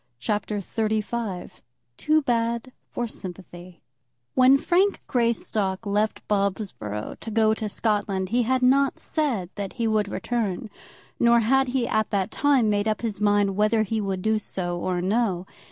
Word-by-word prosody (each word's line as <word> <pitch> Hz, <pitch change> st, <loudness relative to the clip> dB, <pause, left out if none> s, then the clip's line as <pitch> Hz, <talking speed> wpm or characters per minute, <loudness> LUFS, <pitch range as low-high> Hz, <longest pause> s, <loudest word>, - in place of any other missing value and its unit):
CHAPTER 210 Hz, -, -2 dB
XXXV 215 Hz, -2 st, -2 dB, 0.4 s
Too 310 Hz, -, +2 dB
Bad 235 Hz, 0 st, 0 dB, 0.2 s
for 240 Hz, -, -3 dB
Sympathy 180 Hz, -3 st, -10 dB, 0.5 s
When 260 Hz, +2 st, +6 dB
Frank 370 Hz, +7 st, +2 dB
Greystock 225 Hz, -5 st, 0 dB
left 210 Hz, +2 st, -1 dB
Bobsborough 195 Hz, -, -2 dB
to 225 Hz, -, -7 dB
go 220 Hz, 0 st, +3 dB
to 220 Hz, -1 st, -3 dB
Scotland, 200 Hz, -3 st, -1 dB
he 240 Hz, +3 st, +2 dB
had 255 Hz, +2 st, +1 dB
not 275 Hz, +2 st, +4 dB
said 240 Hz, -, -2 dB
that 200 Hz, -2 st, -5 dB
he 235 Hz, -2 st, -1 dB
would 215 Hz, -2 st, +1 dB
return, 220 Hz, -4 st, -2 dB, 0.5 s
nor 235 Hz, 0 st, +5 dB
had 265 Hz, +4 st, +3 dB
he 250 Hz, -1 st, 0 dB
at 215 Hz, 0 st, 0 dB
that 195 Hz, -2 st, -1 dB
time 275 Hz, -5 st, +3 dB
made 205 Hz, 0 st, +1 dB
up 215 Hz, -1 st, 0 dB
his 210 Hz, -3 st, -3 dB
mind 205 Hz, -1 st, +3 dB
whether 215 Hz, +2 st, +3 dB
he 220 Hz, +1 st, -2 dB
would 190 Hz, -2 st, -3 dB
do 220 Hz, 0 st, +2 dB
so 175 Hz, -4 st, -3 dB
or 180 Hz, 0 st, -1 dB
no. 195 Hz, -3 st, 0 dB
215 Hz, 155 wpm, -25 LUFS, 195-235 Hz, 0.5 s, When